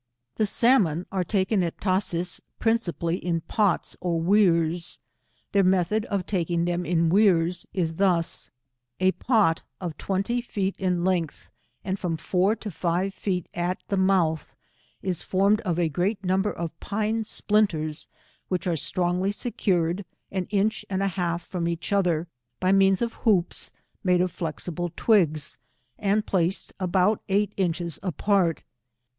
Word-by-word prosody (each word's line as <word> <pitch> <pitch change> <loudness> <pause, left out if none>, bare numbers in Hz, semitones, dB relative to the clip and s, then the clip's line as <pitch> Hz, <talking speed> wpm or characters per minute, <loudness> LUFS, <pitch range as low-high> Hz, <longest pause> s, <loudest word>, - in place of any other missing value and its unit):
The 215 - +2
salmon 195 - +3
are 190 -2 0
taken 195 +1 +1
at 170 -2 -3
Tashees, 180 -2 0 0.2
principally 180 -7 0
in 170 -2 -2
pots 205 +1 0
or 170 -2 0
wears. 170 -2 +2 0.5
Their 200 -1 +4
method 190 +4 +2
of 200 -6 -2
taking 170 -3 0
thera 175 0 -1
in 170 -1 +2
wears 180 -3 +3
is 165 -4 -1
thus: 180 -4 +1 0.3
— 120 0 -54
A 185 0 +4
pot 210 -8 +2 0.2
of 175 -4 -4
twenty 200 +6 -1
feet 200 -5 -2
in 180 -2 0
length, 175 -5 -1 0.3
and 190 0 -2
from 170 -3 -2
four 185 +6 +1
to 215 -2 -7
five 180 +3 -1
feet 185 -3 -2
diameter 175 +1 0
at - - -38
the 200 - 0
mouth, 180 -5 +1 0.5
is 185 -3 -1
formed 200 +3 +2
of 180 -7 -1
a 175 -2 +2
great 190 +7 -1
number 190 +3 +1
of 165 -1 -6
pine 220 +2 -1
splinters 180 -9 0 0.4
which 180 -2 -2
are 175 -2 +1
strongly 180 +5 0
secured, 190 -5 0 0.3
an 190 -2 -2
inch 210 +1 +1
and 190 0 -1
a 195 - +2
half 175 -2 -2
from 175 -2 -3
each 170 +4 -2
other, 175 -4 +1 0.3
by 185 - +2
means 195 +2 +4
of 235 - -2
hoops 190 -6 +1 0.3
made 180 -2 +3
of 180 0 +1
flexible 170 +1 -3
twigs, 160 - +2 0.4
and 210 +1 +1
placed 185 0 0
abought 185 +3 +2
eight 205 +1 +1
inches 170 -3 -1
apart. 185 -2 +1
185 Hz, 150 wpm, -25 LUFS, 170-200 Hz, 0.5 s, Their